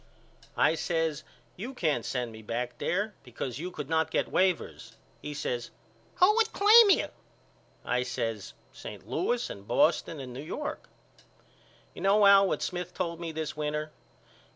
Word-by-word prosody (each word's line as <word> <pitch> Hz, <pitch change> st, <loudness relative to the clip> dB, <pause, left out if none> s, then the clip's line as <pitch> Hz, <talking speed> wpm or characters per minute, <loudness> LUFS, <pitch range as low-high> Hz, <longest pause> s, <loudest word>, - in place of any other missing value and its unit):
I -, -, +4 dB
says 160 Hz, -2 st, -1 dB, 0.3 s
You 245 Hz, +8 st, -7 dB
can't 160 Hz, -9 st, 0 dB
send 125 Hz, -3 st, -3 dB
me 110 Hz, 0 st, -11 dB
back 120 Hz, +3 st, -4 dB
there 205 Hz, +4 st, -1 dB
because 125 Hz, 0 st, -6 dB
you 175 Hz, +3 st, -4 dB
could 150 Hz, -6 st, -7 dB
not 160 Hz, 0 st, +1 dB
get -, -, -1 dB
waivers. 185 Hz, -2 st, 0 dB, 0.3 s
He 150 Hz, 0 st, -6 dB
says 120 Hz, -4 st, -3 dB, 0.5 s
Who 385 Hz, +4 st, +5 dB
would 455 Hz, -1 st, +3 dB
claim 425 Hz, +2 st, +7 dB
you? -, -, +3 dB, 0.8 s
I 125 Hz, 0 st, +1 dB
says 115 Hz, -4 st, -3 dB, 0.2 s
St. -, -, -10 dB
Louis 235 Hz, -, -1 dB
and 100 Hz, 0 st, -10 dB
Boston 160 Hz, -1 st, +2 dB
and 130 Hz, -2 st, -7 dB
New 130 Hz, -, -6 dB
York. 285 Hz, -, -5 dB, 1.0 s
You -, -, -10 dB
know 200 Hz, +2 st, +4 dB
Al 200 Hz, 0 st, +7 dB
what -, -, -1 dB
Smith 180 Hz, -1 st, -4 dB
told 170 Hz, -1 st, -3 dB
me 170 Hz, -1 st, -4 dB
this 155 Hz, -1 st, -4 dB
winter. 150 Hz, 0 st, -3 dB
160 Hz, 155 wpm, -29 LUFS, 125-195 Hz, 1.0 s, claim